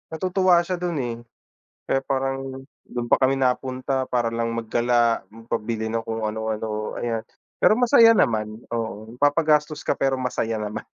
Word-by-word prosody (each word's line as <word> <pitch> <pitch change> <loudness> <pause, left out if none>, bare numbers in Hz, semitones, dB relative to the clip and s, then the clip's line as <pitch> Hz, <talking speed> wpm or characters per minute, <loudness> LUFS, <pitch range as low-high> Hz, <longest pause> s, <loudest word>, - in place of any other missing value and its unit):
natutuwa 185 0 +3
siya 180 0 -3
do'n, 175 -2 -2
eh. 120 -1 -3 0.7
Kaya 135 - +1
parang 135 0 -2 0.2
do'n 120 -1 -4
pa - - +5
kami 135 0 +3
napunta 130 0 -1
para 120 -2 0
lang 115 0 -1
magdala 120 0 +1
magpabili 110 0 -4
ng 115 - 0
kung 110 -1 -3
ano-ano 110 0 -3
ayan. 115 -2 -2 0.4
Pero 215 - +5
masaya 230 -2 +6
naman, 110 -4 +1 0.2
oo, 110 -1 -4
napapagastos 150 +1 +2
ka - - +2
pero 135 -1 0
masaya 115 -3 -2
naman, 105 0 -4
120 Hz, 150 wpm, -23 LUFS, 115-135 Hz, 0.7 s, masaya